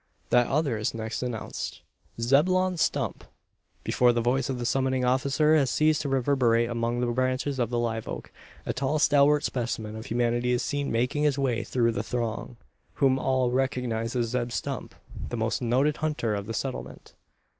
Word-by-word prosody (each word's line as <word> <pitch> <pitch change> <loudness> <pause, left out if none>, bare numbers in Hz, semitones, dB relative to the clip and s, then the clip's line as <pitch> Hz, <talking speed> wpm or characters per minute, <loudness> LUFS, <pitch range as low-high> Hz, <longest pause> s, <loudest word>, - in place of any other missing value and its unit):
That 120 -1 +4
other 140 -6 0
is 110 - -2
next 110 0 -4
announced. 120 -3 -5 0.4
"Zebulon 180 +9 +3
Stump!" - - -1 0.6
Before 125 -1 +3
the 120 - 0
voice 125 +4 +1
of 130 - -2
the 120 - -4
summoning 130 0 +1
officer 135 +4 +3
has 140 -4 +3
ceased 155 +2 +2
to 140 - -3
reverberate 125 -3 +2
among 120 +1 -1
the - - +1
branches 130 +2 -1
of 120 -3 +1
the 120 - -1
live 115 -2 -2
oak, - - -6 0.3
a - - -1
tall 140 +3 0
stalwart 150 0 +4
specimen 115 -3 -3
of 110 +3 -7
humanity 120 +1 +1
is 120 - 0
seen 145 -1 -2
making 125 +5 0
his 150 -2 +2
way 130 -4 0
through 115 -2 +1
the 115 - -2
throng 120 0 -4 0.4
whom 135 -1 +3
all 130 -2 +1
recognise 125 -3 -1
as 120 -2 0
Zeb 120 0 -2
Stump, - - -4 0.3
the 120 - -3
most 115 +2 -1
noted 130 +5 +2
hunter 150 -8 -1
of 100 -1 -4
the 115 - -4
Settlement. 130 +3 -5
125 Hz, 175 wpm, -27 LUFS, 115-135 Hz, 0.6 s, That